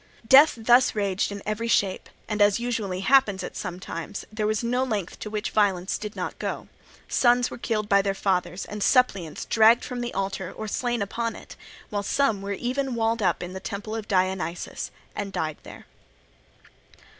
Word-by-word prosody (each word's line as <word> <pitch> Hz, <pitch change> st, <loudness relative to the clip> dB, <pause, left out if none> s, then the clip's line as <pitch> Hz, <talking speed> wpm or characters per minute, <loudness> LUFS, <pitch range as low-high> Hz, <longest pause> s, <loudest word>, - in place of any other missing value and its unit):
Death 280 Hz, +6 st, +8 dB
thus 240 Hz, +2 st, +4 dB
raged 200 Hz, -1 st, 0 dB
in 200 Hz, -1 st, -7 dB
every 215 Hz, +2 st, -2 dB
shape; 200 Hz, -4 st, +1 dB, 0.2 s
and, 210 Hz, -1 st, -2 dB
as 205 Hz, +1 st, +5 dB
usually 220 Hz, -6 st, -2 dB
happens 205 Hz, -5 st, +3 dB
at -, -, -7 dB
such 180 Hz, -2 st, -5 dB
times, 170 Hz, +2 st, -6 dB
there 215 Hz, -1 st, -1 dB
was 215 Hz, +1 st, 0 dB
no 245 Hz, +2 st, +1 dB
length 210 Hz, -8 st, -3 dB
to 210 Hz, -, -5 dB
which 210 Hz, 0 st, -3 dB
violence 195 Hz, -3 st, +1 dB
did 210 Hz, -1 st, -6 dB
not -, -, -5 dB
go; -, -, -4 dB, 0.4 s
sons 245 Hz, 0 st, +3 dB
were -, -, -6 dB
killed 215 Hz, -3 st, -1 dB
by 200 Hz, -1 st, +5 dB
their 195 Hz, 0 st, -1 dB
fathers, 185 Hz, -1 st, -1 dB
and 210 Hz, 0 st, -7 dB
suppliants 195 Hz, -, +2 dB
dragged 225 Hz, +1 st, +5 dB
from 245 Hz, -1 st, -4 dB
the 240 Hz, 0 st, -3 dB
altar 195 Hz, -1 st, -3 dB
or 220 Hz, -, -6 dB
slain 240 Hz, 0 st, -1 dB
upon 230 Hz, +3 st, -3 dB
it; -, -, -11 dB, 0.4 s
while 205 Hz, -1 st, -1 dB
some 220 Hz, -1 st, +1 dB
were 200 Hz, 0 st, -3 dB
even 255 Hz, +4 st, -2 dB
walled 225 Hz, 0 st, 0 dB
up 180 Hz, -2 st, +1 dB
in 180 Hz, +1 st, -6 dB
the 190 Hz, -, -5 dB
temple 205 Hz, +2 st, -5 dB
of 220 Hz, -2 st, -4 dB
Dionysus 185 Hz, -3 st, -1 dB, 0.3 s
and 200 Hz, -1 st, -4 dB
died 155 Hz, -4 st, -2 dB
there. -, -, -12 dB
210 Hz, 185 wpm, -25 LUFS, 195-235 Hz, 0.4 s, Death